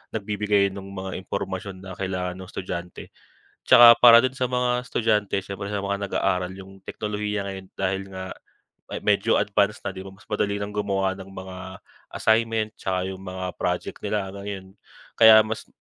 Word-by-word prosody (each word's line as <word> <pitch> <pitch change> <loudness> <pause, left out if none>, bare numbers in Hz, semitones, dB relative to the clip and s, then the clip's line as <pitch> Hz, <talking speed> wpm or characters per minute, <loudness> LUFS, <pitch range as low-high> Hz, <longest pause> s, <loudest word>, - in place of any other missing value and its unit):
nagbibigay 105 -1 +1
no'ng 95 0 -8
mga 95 -1 -5
impormasyon 95 0 -5
na 95 - -8
kailangan 90 -1 -3
no'ng 95 - -9
estudyante. 90 -2 -7 0.6
Tsaka 120 -1 +9
para 120 -1 +9
do'n 130 +1 -1
sa 130 - +2
mga 125 0 0
estudyante, 105 -3 +1
siyempre 100 +1 -6
sa 100 0 -3
mga 100 0 -2
nag-aaral, 90 -1 -1
’yong 95 0 -12
teknolohiya 105 -1 -3
ngayon 95 -1 -6
dahil 95 +1 -1
nga 95 -1 -7 0.8
medyo - - +3
advanced 100 +1 0
na, 95 - -3
’di 95 - -7
ba, 95 - -10
mas 95 +2 -19
madali 100 -1 -1
ng 100 0 -5
gumawa 95 -2 0
ng 95 0 -11
mga 95 -1 -9 0.5
assignment 110 -1 +1
tsaka 95 -1 -1
’yong 95 0 -7
mga 95 -1 -6 0.2
project 90 0 -2
nila, 100 -3 -2
gano'n. 100 -1 -7 0.4
Kaya 110 -1 +8
mas 110 0 -5
100 Hz, 165 wpm, -24 LUFS, 95-105 Hz, 0.8 s, Tsaka